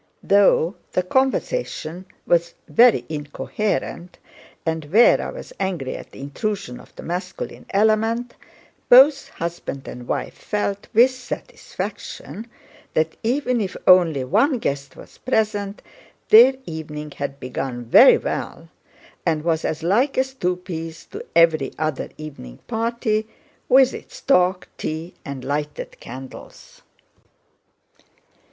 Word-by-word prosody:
Though 200 Hz, -3 st, +4 dB, 0.2 s
the 185 Hz, -, +1 dB
conversation 195 Hz, -, -1 dB, 0.2 s
was 170 Hz, 0 st, +1 dB
very 240 Hz, -1 st, +5 dB
incoherent 170 Hz, +4 st, -3 dB, 0.5 s
and 160 Hz, -2 st, -2 dB
Véra 220 Hz, +10 st, +4 dB
was -, -, -10 dB
angry 170 Hz, -9 st, -2 dB
at -, -, -9 dB
the -, -, -14 dB
intrusion 145 Hz, -, -4 dB
of -, -, -17 dB
the -, -, -9 dB
masculine 185 Hz, -, -5 dB
element, 220 Hz, +3 st, +1 dB, 0.6 s
both 275 Hz, +3 st, +7 dB
husband 170 Hz, -5 st, -5 dB
and 120 Hz, 0 st, -8 dB
wife 135 Hz, -3 st, -2 dB
felt 205 Hz, -1 st, -3 dB
with 245 Hz, +4 st, +6 dB
satisfaction 255 Hz, -, -7 dB, 0.5 s
that, 160 Hz, 0 st, +1 dB
even 250 Hz, 0 st, 0 dB
if 190 Hz, -3 st, -4 dB
only 170 Hz, -7 st, +5 dB
one 225 Hz, -, +2 dB
guest 140 Hz, -, -3 dB
was -, -, -15 dB
present, 210 Hz, -4 st, -1 dB, 0.5 s
their 245 Hz, +5 st, +8 dB
evening 150 Hz, -3 st, -6 dB
had 140 Hz, 0 st, -5 dB
begun 125 Hz, -1 st, -4 dB
very 115 Hz, -, +8 dB
well -, -, -5 dB, 0.5 s
and 155 Hz, -2 st, 0 dB
was 165 Hz, -1 st, 0 dB
as 160 Hz, +1 st, -3 dB
like 235 Hz, -, +2 dB
as 265 Hz, 0 st, +1 dB
two 180 Hz, -8 st, -1 dB
peas 165 Hz, -3 st, -7 dB
to -, -, -7 dB
every 160 Hz, -4 st, +4 dB
other 155 Hz, -2 st, -2 dB
evening 135 Hz, -, -9 dB
party 225 Hz, -1 st, -1 dB, 0.4 s
with 265 Hz, 0 st, +6 dB
its -, -, -10 dB
talk, 180 Hz, -7 st, +2 dB
tea, 160 Hz, +3 st, -4 dB
and 140 Hz, -3 st, -7 dB
lighted 145 Hz, +1 st, -4 dB
candles. 130 Hz, +2 st, -11 dB
180 Hz, 120 wpm, -22 LUFS, 155-225 Hz, 0.6 s, their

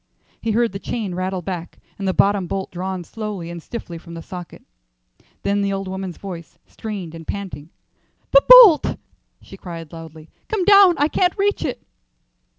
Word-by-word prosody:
He 230 Hz, -, -3 dB
heard 235 Hz, +1 st, +2 dB
the 195 Hz, -, -6 dB
chain 210 Hz, -4 st, -4 dB
rattle 185 Hz, 0 st, -3 dB
back 175 Hz, -2 st, -6 dB, 0.2 s
and 195 Hz, -, -3 dB
the -, -, +3 dB
bottom 200 Hz, -2 st, +2 dB
bolt 190 Hz, +2 st, -4 dB
drawn 185 Hz, 0 st, -4 dB
slowly 205 Hz, -4 st, -6 dB
and 170 Hz, -1 st, -7 dB
stiffly 175 Hz, -4 st, -7 dB
from 170 Hz, 0 st, -11 dB
the 165 Hz, -, -8 dB
socket. 175 Hz, -4 st, -9 dB, 0.8 s
Then 200 Hz, 0 st, +1 dB
the 200 Hz, 0 st, 0 dB
old 195 Hz, 0 st, -3 dB
woman's 190 Hz, -2 st, -5 dB
voice, 175 Hz, -4 st, -9 dB
strained 200 Hz, -7 st, -7 dB
and 165 Hz, -1 st, -10 dB
panting. 180 Hz, -7 st, -6 dB, 0.6 s
"The -, -, +7 dB
bolt," 470 Hz, -11 st, +9 dB, 0.5 s
she 195 Hz, -, -12 dB
cried, 165 Hz, -4 st, -9 dB
loudly. 160 Hz, -1 st, -11 dB, 0.2 s
"Come 425 Hz, -5 st, -1 dB
down. 395 Hz, -3 st, +7 dB
I 290 Hz, -, +3 dB
can't 360 Hz, +3 st, 0 dB
reach 410 Hz, +1 st, 0 dB
it." -, -, -4 dB
190 Hz, 170 wpm, -21 LUFS, 170-225 Hz, 0.8 s, bolt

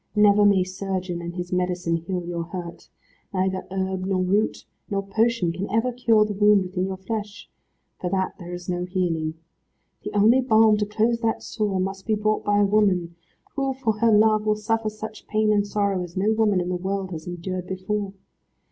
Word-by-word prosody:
Never 210 Hz, 0 st, +5 dB
may 200 Hz, -2 st, +5 dB
surgeon 185 Hz, -1 st, -4 dB
and 170 Hz, 0 st, -6 dB
his 180 Hz, 0 st, -4 dB
medicine 180 Hz, -2 st, 0 dB
heal 175 Hz, +1 st, -4 dB
your 170 Hz, -1 st, -3 dB
hurt. 175 Hz, -1 st, -8 dB, 0.5 s
Neither 190 Hz, 0 st, -1 dB
herb 190 Hz, 0 st, -2 dB
nor 190 Hz, -1 st, 0 dB
root 200 Hz, +4 st, 0 dB, 0.2 s
nor 195 Hz, -1 st, -2 dB
potion 220 Hz, -2 st, +1 dB
can 185 Hz, +4 st, -4 dB
ever 225 Hz, +4 st, +1 dB
cure 230 Hz, -3 st, +3 dB
the 210 Hz, -, -3 dB
wound 205 Hz, 0 st, +4 dB
within 185 Hz, 0 st, -2 dB
your 190 Hz, -1 st, -4 dB
flesh: 210 Hz, +2 st, -6 dB, 0.5 s
For 180 Hz, -, -2 dB
that 190 Hz, 0 st, -2 dB
there 175 Hz, -1 st, -8 dB
is 175 Hz, 0 st, -7 dB
no 180 Hz, 0 st, -2 dB
healing. 170 Hz, -4 st, -1 dB, 0.7 s
The -, -, -5 dB
only 225 Hz, +6 st, +5 dB
balm 220 Hz, -3 st, +5 dB
to 210 Hz, -1 st, -1 dB
close 225 Hz, +3 st, +1 dB
that 225 Hz, -1 st, -1 dB
sore 210 Hz, -4 st, -2 dB
must 195 Hz, +2 st, -3 dB
be 220 Hz, -, +2 dB
brought 215 Hz, 0 st, 0 dB
by 205 Hz, 0 st, +2 dB
a -, -, +5 dB
woman, 195 Hz, -5 st, +2 dB, 0.4 s
who 270 Hz, -1 st, 0 dB
for 225 Hz, -5 st, -1 dB
her 230 Hz, 0 st, +4 dB
love 215 Hz, 0 st, +4 dB
will 215 Hz, -, +3 dB
suffer 220 Hz, +1 st, -1 dB
such 215 Hz, 0 st, -9 dB
pain 215 Hz, 0 st, +2 dB
and 205 Hz, -1 st, +1 dB
sorrow 200 Hz, -2 st, 0 dB
as 175 Hz, 0 st, -7 dB
no 210 Hz, +4 st, +2 dB
woman 215 Hz, -4 st, +2 dB
in 175 Hz, 0 st, -2 dB
the 180 Hz, -, -1 dB
world 190 Hz, +1 st, -3 dB
has 160 Hz, -1 st, -7 dB
endured 180 Hz, +1 st, -5 dB
before. 195 Hz, +2 st, -3 dB
195 Hz, 195 wpm, -24 LUFS, 180-215 Hz, 0.7 s, Never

